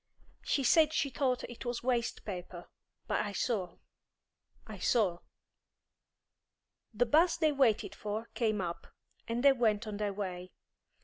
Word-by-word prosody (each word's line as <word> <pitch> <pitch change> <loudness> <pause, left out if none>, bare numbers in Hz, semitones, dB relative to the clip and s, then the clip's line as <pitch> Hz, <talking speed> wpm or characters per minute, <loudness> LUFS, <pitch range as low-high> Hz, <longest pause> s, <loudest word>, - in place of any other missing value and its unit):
She 275 - 0
said 310 +4 +5
she 280 -3 0
thought 255 0 0
it 240 - -8
was 240 -1 -3
waste 240 -2 -1
paper, 180 -3 -7 0.4
but - - 0
I 205 - -4
saw, 195 -5 -2 0.9
I 215 -4 -9
saw." 185 -4 +2 1.7
The 235 +2 +1
'bus 320 +8 +4
they 315 -2 +3
waited 265 -7 +2
for 215 +2 -4
came 215 -4 0
up, 170 -1 -5 0.4
and 235 +2 -2
they 280 -1 +7
went 230 -4 +1
on 210 -1 -5
their 205 -1 -1
way. 185 -2 -5
225 Hz, 140 wpm, -32 LUFS, 205-255 Hz, 1.7 s, they